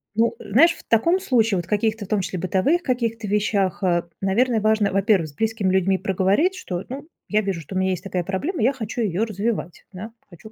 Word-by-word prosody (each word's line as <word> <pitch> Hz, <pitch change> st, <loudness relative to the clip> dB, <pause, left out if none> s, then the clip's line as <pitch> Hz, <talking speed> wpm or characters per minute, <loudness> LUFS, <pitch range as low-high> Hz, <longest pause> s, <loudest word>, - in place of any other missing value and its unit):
Ну, 230 Hz, +1 st, +2 dB
знаешь, 275 Hz, -, +4 dB
в -, -, -15 dB
таком 335 Hz, -, +2 dB
случае, 230 Hz, -, +2 dB
вот 175 Hz, -, -3 dB
в -, -, -23 dB
каких-то, 215 Hz, 0 st, 0 dB
в -, -, -14 dB
том 210 Hz, 0 st, 0 dB
числе 185 Hz, 0 st, -4 dB
в -, -, -5 dB
бытовых 275 Hz, -, +1 dB
каких-то 230 Hz, -4 st, -2 dB
вещах, 200 Hz, -2 st, 0 dB
а, 175 Hz, -2 st, +1 dB
наверное, 220 Hz, +4 st, +1 dB
важно, 215 Hz, -1 st, +2 dB
во-первых, 195 Hz, -3 st, +2 dB
с 145 Hz, -, -14 dB
близкими 220 Hz, -4 st, 0 dB
людьми 190 Hz, 0 st, +2 dB
проговорить, 195 Hz, -, +1 dB
что, 180 Hz, -, -5 dB
ну, 275 Hz, +4 st, -7 dB, 0.2 s
"я 215 Hz, 0 st, +2 dB
вижу, 190 Hz, -5 st, -3 dB
у -, -, -4 dB
меня 190 Hz, 0 st, +1 dB
есть 180 Hz, -, -4 dB
такая 185 Hz, -2 st, -2 dB
проблема, 230 Hz, -, -3 dB
я 260 Hz, +5 st, +3 dB
хочу 235 Hz, -1 st, -4 dB
её 205 Hz, 0 st, 0 dB
развивать, 210 Hz, -4 st, -3 dB
да, 205 Hz, +4 st, -8 dB, 0.2 s
хочу 185 Hz, +5 st, -14 dB
210 Hz, 215 wpm, -22 LUFS, 190-230 Hz, 0.2 s, знаешь